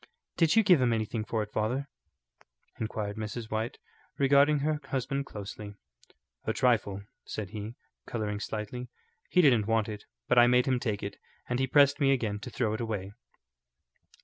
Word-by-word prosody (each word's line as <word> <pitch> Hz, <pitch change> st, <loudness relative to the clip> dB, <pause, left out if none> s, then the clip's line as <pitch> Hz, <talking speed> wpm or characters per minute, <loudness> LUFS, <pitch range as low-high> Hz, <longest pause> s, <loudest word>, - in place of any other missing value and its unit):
"Did 165 Hz, +2 st, +3 dB
you 225 Hz, -, +6 dB
give 180 Hz, -8 st, +5 dB
him 120 Hz, -2 st, +3 dB
anything 110 Hz, 0 st, -1 dB
for 110 Hz, 0 st, -1 dB
it, 105 Hz, -, -10 dB
father?" 125 Hz, +6 st, -1 dB, 0.9 s
inquired 110 Hz, -1 st, -3 dB
Mrs. 110 Hz, +1 st, -5 dB
White, 110 Hz, +2 st, -2 dB, 0.4 s
regarding 140 Hz, +1 st, +4 dB
her 155 Hz, -1 st, +1 dB
husband 140 Hz, +1 st, -2 dB
closely. 105 Hz, 0 st, -8 dB, 0.7 s
"A 110 Hz, -, 0 dB
trifle," 105 Hz, -6 st, +1 dB, 0.2 s
said 100 Hz, -3 st, -6 dB
he, 110 Hz, +2 st, -6 dB, 0.3 s
colouring 105 Hz, -3 st, -3 dB
slightly. 110 Hz, +4 st, -5 dB, 0.4 s
"He 180 Hz, -, +4 dB
didn't 120 Hz, -8 st, +4 dB
want 115 Hz, -2 st, +2 dB
it, 105 Hz, -2 st, -7 dB, 0.2 s
but 125 Hz, -, +5 dB
I 120 Hz, -, +7 dB
made 125 Hz, 0 st, +4 dB
him 130 Hz, -2 st, +1 dB
take 105 Hz, -5 st, -2 dB
it. 100 Hz, 0 st, -5 dB, 0.3 s
And 125 Hz, 0 st, -1 dB
he 130 Hz, -, +1 dB
pressed 140 Hz, +1 st, +5 dB
me 135 Hz, -2 st, +4 dB
again 110 Hz, -6 st, 0 dB
to -, -, -7 dB
throw 110 Hz, -4 st, -1 dB
it 110 Hz, -, -3 dB
away." 105 Hz, -4 st, -3 dB
115 Hz, 170 wpm, -29 LUFS, 105-135 Hz, 0.9 s, I